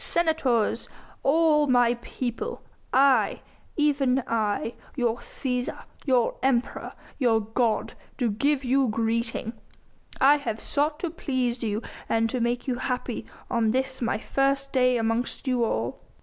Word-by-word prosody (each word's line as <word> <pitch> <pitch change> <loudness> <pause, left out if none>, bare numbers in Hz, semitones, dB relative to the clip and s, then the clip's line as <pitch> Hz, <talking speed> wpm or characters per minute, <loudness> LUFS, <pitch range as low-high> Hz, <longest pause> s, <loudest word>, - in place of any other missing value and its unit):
senators! 315 -10 +1 0.3
all 300 0 +4
my 245 -2 +4
people! 245 - -5 0.3
I 260 -5 +4 0.4
even 275 -4 +2
I 220 0 -1 0.2
your 240 -4 +1
Cæsar, 250 0 -4 0.2
your 250 -3 +2
Emperor, 260 -1 0 0.3
your 235 -4 +4
god, 225 +1 0 0.2
do 240 -5 +1
give 275 +6 +1
you 265 +1 +3
greeting! 230 +1 -1 0.7
I 285 +2 +6
have 225 -7 -4
sought 300 +2 0
to 345 - -2
please 255 -6 -1
you 215 0 -2 0.3
and 225 0 +2
to 250 - -1
make 240 +2 -1
you 250 -2 0
happy 250 -2 -3 0.2
on 230 -3 +1
this 260 +2 -1
my 230 - +1
first 275 +3 0
day 255 -2 +4
amongst 230 +4 -1
you 250 -2 +2
all." 120 - -1
250 Hz, 135 wpm, -26 LUFS, 230-275 Hz, 0.7 s, I